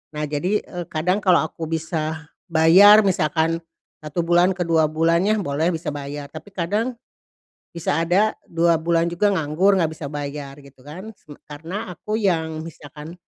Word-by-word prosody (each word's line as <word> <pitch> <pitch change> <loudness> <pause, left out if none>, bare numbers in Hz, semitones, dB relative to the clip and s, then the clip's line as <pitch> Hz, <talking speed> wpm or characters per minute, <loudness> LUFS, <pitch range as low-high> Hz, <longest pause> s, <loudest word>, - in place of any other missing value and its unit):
Nah, 150 - -3
jadi, 155 +8 -1
eee, 175 -1 -7
kadang 180 +5 0
kalau 185 -5 +3
aku 160 0 -6
bisa 160 -1 -3 0.2
bayar 185 +6 +7
misalkan, 165 -3 0 0.4
1 155 +3 -3
bulan 175 +2 +3
ke 180 - -2
2 160 -2 +2
bulannya 165 +6 +1
boleh 160 +4 0
bisa 160 -1 -4
bayar. 145 0 -7
Tapi 160 +6 -10
kadang, 210 +8 -1 0.8
bisa 165 -2 -1
ada 190 +6 +2 0.2
2 170 0 +2
bulan 170 0 +1
juga 205 +4 +1
nganggur 170 +5 +2
nggak 165 -3 +1
bisa 155 -2 -7
bayar 145 -1 -6
gitu 140 -2 -17
kan 185 +10 -10
seme 150 -7 -15
karena 165 +9 -7
aku 215 +6 -4
yang 160 -6 -1
misalkan 150 0 -11
165 Hz, 160 wpm, -22 LUFS, 155-180 Hz, 0.8 s, bayar